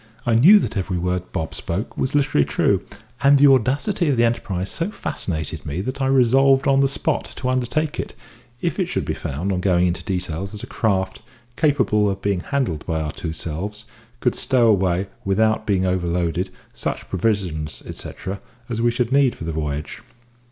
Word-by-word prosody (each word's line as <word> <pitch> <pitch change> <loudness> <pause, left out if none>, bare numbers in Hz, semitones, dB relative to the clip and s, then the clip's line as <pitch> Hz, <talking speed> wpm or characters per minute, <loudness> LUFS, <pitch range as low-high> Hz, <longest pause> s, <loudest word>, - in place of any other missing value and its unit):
I 120 - +2
knew 160 - +8
that 200 - -1
every 95 -2 -1
word 90 +1 -2
Bob 80 0 -3
spoke 95 +7 -4
was 130 +2 -1
literally 135 - +3
true, - - +1 0.4
and 140 +1 +6
the 140 - +6
audacity 140 - +3
of 135 - +1
the 115 - +4
enterprise 100 -5 -1
so 170 +4 -2
fascinated 80 - -4
me 75 +2 -4
that 130 +6 -4
I 135 - +2
resolved 135 +1 +4
on 135 -1 +4
the 135 0 +4
spot - - -1
to 125 - -2
undertake 130 +5 -1
it, - - -5 0.5
if - - -1
it - - +1
should - - -2
be - - -1
found, 80 +9 -3
on 90 -1 -1
going 90 -2 +3
into 90 0 -1
details, 90 +1 -3
that 105 - -8
a - - -3
craft, 95 -4 -1 0.3
capable 125 -9 +2
of 95 0 -3
being 100 -2 0
handled 120 - -2
by 80 -1 0
our 75 -1 -2
two 80 - -5
selves, 95 +7 -5 0.4
could 125 - +2
stow 120 -3 +3
away, 95 -2 +2 0.2
without 110 +3 +1
being 95 -3 +2
overloaded, 90 0 0 0.2
such - - -4
provisions; 90 -6 -1
etcetera, 95 +1 -6 0.3
as 115 -1 -2
we 120 - +4
should 120 0 -1
need 135 -2 +4
for - - -8
the 80 0 -3
voyage. 75 -1 -4
100 Hz, 185 wpm, -22 LUFS, 90-130 Hz, 0.5 s, knew